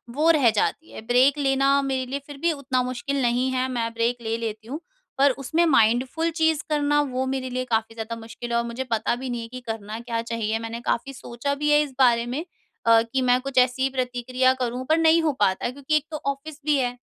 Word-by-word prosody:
वो 310 +3 +3
रह 280 -7 +4
जाती 225 +8 -1
है। - - -8
ब्रेक 260 +4 +4
लेना 275 0 +3
मेरे 265 -1 -1
लिए 280 - -2
फिर 290 -1 -9
भी 335 +4 +1
उतना 270 -4 -1
मुश्किल 255 +2 -2
नहीं 245 +2 +1
है 255 0 0
मैं 230 -2 -2
ब्रेक 230 +1 0
ले 225 0 -2
लेती 220 -1 -5
हूँ। 285 +6 -5 0.4
पर 275 0 +5
उसमें 320 +6 +1
माइंडफुल 265 +4 +2
चीज़ 320 -1 +1
करना 295 -1 +2
वो 255 +1 -1
मेरे 260 -1 -3
लिए 255 0 -3
काफ़ी 225 0 -2
ज़्यादा 225 +1 -5
मुश्किल 230 +1 -8
है 235 - +2
और 235 - +1
मुझे 235 +3 -4
पता 230 - 0
भी 260 +1 -6
नहीं 240 -1 -3
है 230 - -7
कि 255 +2 -8
करना 220 -2 -6
क्या 235 -1 -3
चाहिए? 225 -1 -2
मैंने 230 +1 -5
काफ़ी 255 +3 -2
सोचा 245 +2 -4
भी 295 +1 -1
है 295 - +6
इस 295 -2 -3
बारे 235 -2 +4
में 270 +8 -4 0.4
अ, 230 0 +6
कि 235 +3 -2
मैं 250 0 +3
कुछ 275 -1 -6
ऐसी 250 +1 +3
ही 270 - +2
प्रतिक्रिया 255 0 0
करूँ 250 +1 -2
पर 315 - +4
नहीं 325 0 +5
हो 315 - +2
पाता 190 +5 +1
क्योंकि 280 +4 -2
एक 300 - +2
तो 305 - -3
ऑफिस 285 +2 -10
भी 300 - +3
है। 245 -1 -1
255 Hz, 235 wpm, -24 LUFS, 235-280 Hz, 0.4 s, है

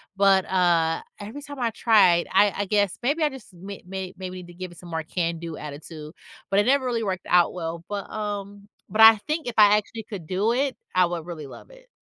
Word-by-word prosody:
but, 195 -1 +4
uh, 170 -3 +2 0.2
every 220 +8 -8
time 285 -2 -9
I 235 -2 0
tried 205 -7 +4
I 200 +1 +4
I 205 - -2
guess, 205 -1 +1
maybe 295 +6 0
I 305 - +4
just 260 -8 -12
ma 195 +3 -8
ma 190 0 -5
maybe 185 -1 -6
need 180 -1 -10
to 175 - -13
give 180 0 -7
it 170 - -15
some 175 - -12
more 160 -1 -2
can-do 165 -1 -3
attitude, 150 +2 -9 0.4
but 195 +1 +3
it - - -2
never 270 -1 +3
really 235 -2 -1
worked 190 -3 -3
out 175 -1 +4
well, 165 -1 -5
but, 200 -1 -5
um, 205 -1 -6 0.2
but 220 +1 0
I 220 -1 +10
think 310 -1 -2
if 235 - -4
I 210 -1 +7
actually 220 +1 -5
could 200 -6 -8
do 200 +7 0
it, 270 +1 -1 0.2
I 185 -1 +5
would 170 -2 -4
really 155 -5 -7
love - - -13
it. - - -18
195 Hz, 230 wpm, -24 LUFS, 175-220 Hz, 0.4 s, I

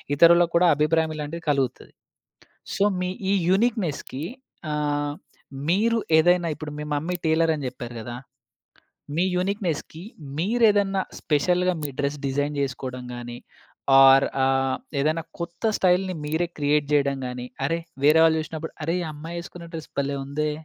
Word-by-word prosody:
ఇతరులకు 170 +2 +6
కూడా 175 +1 +5
అభిప్రాయం 160 +2 +2
ఇలాంటివి 150 +3 -5
కలుగుతది. 135 -4 -1 0.8
సో - - +2 0.2
మీ 180 0 -1 0.2
ఈ - - +4 0.2
యూనిక్‌నెస్‌కి 190 - 0 0.5
ఆహ్, 145 -1 -1 0.6
మీరు 225 +6 +3 0.2
ఏదైనా 175 +1 +3
ఇప్పుడు 150 -1 -7
మీ - - -4
మమ్మీ 170 +5 -2
టైలర్ 160 0 +3
అని 140 - -5
చెప్పారు 120 -1 -9
గదా! 120 +2 -6 1.0
మీ 175 - +2
యూనిక్‌నెస్‌కి 180 -4 -2 0.4
మీరేదన్నా 205 -1 +3 0.2
స్పెషల్‌గా 180 +4 +2
మీ 145 - -2
డ్రెస్ 140 +1 -1
డిజైన్ 145 +2 -1
జేకోవడం 130 -2 -3
గాని, 120 0 -7 0.6
ఓర్ 135 0 +8 0.2
ఆహ్, 135 0 +1 0.2
ఏదైనా 155 +2 0 0.2
కొత్త 170 +5 -6 0.2
స్టైల్‌ని 185 0 +2
మీరే 160 +3 0
క్రియేట్ 145 0 +2
చేయడం 140 -1 +2
గాని, 125 0 -5 0.2
అరె! 165 +4 0 0.3
వేరే 155 +2 +6
వాళ్ళు 160 0 +4
చూశినప్పుడు 160 +1 -6
అరె! 165 +3 0
ఈ - - -2
అమ్మాయి 165 +3 -7
వేసుకున్న 170 0 -9
డ్రెస్ 160 -1 -7
భలే 140 0 -1
ఉందే! 150 +2 -1
160 Hz, 140 wpm, -24 LUFS, 145-175 Hz, 1.0 s, ఓర్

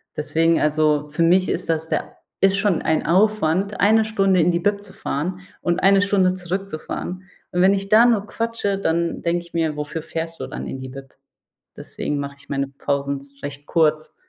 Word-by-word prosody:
Deswegen, 165 +2 +1
also, 150 -1 +2
für 150 +3 0
mich 185 +3 +4
ist - - -2
das 160 0 -1
der - - -3 0.3
ist 195 0 +5
schon 200 -4 +1
ein 160 - 0
Aufwand, 195 +1 +2
eine 220 +2 +5
Stunde 195 -4 +2
in 170 +2 +3
die 170 - 0
Bib 200 +2 0
zu 200 -2 -13
fahren 180 +6 -3 0.2
und 175 0 0
eine 195 0 +5
Stunde 195 -2 +2
zurückzufahren. 185 0 -5 0.3
Und 180 - +1
wenn 190 +2 +6
ich 195 0 -4
da 220 +3 +7
nur 220 -4 +2
quatsche, 225 -3 -2
dann 170 -2 -1
denke 170 0 0
ich 170 - -19
mir: 160 -2 0
„Wofür 150 +2 -4
fährst 165 0 -5
du - - -4
dann - - -6
in - - -5
die 130 0 -7
Bib?“ 135 0 -11 0.6
Deswegen 145 - -4
mache 140 0 -5
ich - - -21
meine 140 -1 -1
Pausen 140 0 -2
z 140 0 -20
recht 145 0 -7
kurz. 155 -2 +1
170 Hz, 195 wpm, -22 LUFS, 150-195 Hz, 0.6 s, da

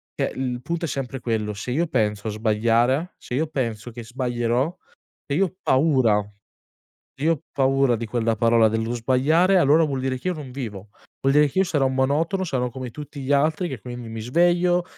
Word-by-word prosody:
cioè, - - -1
il 125 -2 -3
punto 170 +4 -3
è - - -3
sempre 135 -1 -4
quello: 110 -3 -1
se 105 +5 -5
io 165 +6 +1
penso 105 -5 -1
a 110 - -1
sbagliare, 115 - +1
se - - -9
io 155 +4 0
penso 120 -6 -3
che 120 +1 -8
sbaglierò, 120 +4 -1 0.5
se 140 - -2
io 195 - +4
ho 185 - -11
paura, 130 -7 +3 0.9
se 140 - -6
io 165 - +4
ho 145 - -13
paura 135 -2 +2
di 115 +1 -5
quella 115 0 0
parola, 115 0 +4
dello 115 +2 -1
sbagliare, 145 +11 +3
allora 155 0 +5
vuol 140 -3 -2
dire 130 -1 -2
che 185 - -4
io 180 - 0
non 150 -5 -8
vivo. 110 -7 -6 0.4
Vuol 135 - +3
dire 150 0 +6
che 165 - -4
io - - +4
sarò 145 -7 +1
un 130 - -1
monotono, 155 +8 +1
sarò 130 -7 -1
come 130 0 -6
tutti 145 +2 -9
gli 135 - -5
altri 155 +5 +2
che 135 - -5
quindi, 120 -2 -8
mi 115 0 -6
sveglio, 175 +7 +2
130 Hz, 210 wpm, -23 LUFS, 115-150 Hz, 0.9 s, dire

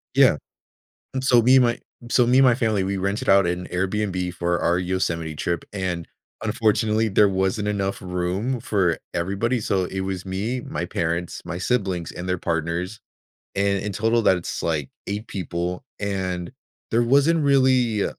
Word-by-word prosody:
Yeah. - - +6 0.8
And 130 - -1
so 120 -3 +5
me 130 +3 +6
and 130 - +6
my 120 0 +1 0.3
so 125 -1 +4
me 125 +2 +4
and 135 - +7
my 125 -2 +6
family, 110 -5 +1
we 95 +1 -1
rented 100 +3 -2
out 100 -1 +6
an 90 +1 -2
Airbnb 95 -1 -1
for 85 0 0
our 85 - +2
Yosemite 85 -4 -2
trip, 85 +2 -2
and, 90 -4 -3 0.3
unfortunately, 110 0 +1
there 105 0 +4
wasn't 95 +2 0
enough 100 -1 -1
room 90 +7 -2
for 95 -7 +1 0.2
everybody. 100 +8 -1
So 95 -3 0
it 95 +1 -4
was 95 -1 -3
me, 105 +7 -2
my 85 +4 -4
parents, 85 0 -2
my 85 - -5
siblings, 95 -5 -1
and 90 - -7
their 90 0 0
partners, 85 +5 -2 0.6
and 100 0 +1
in 105 - -3
total, 115 +4 +1
that's, 90 -5 +1
like, 75 -4 -1 0.2
8 105 +3 -3
people, 90 -2 -3 0.2
and 95 -2 -3 0.4
there 115 +1 +4
wasn't 140 +7 +3
really 130 -6 +3
95 Hz, 165 wpm, -23 LUFS, 90-110 Hz, 0.8 s, and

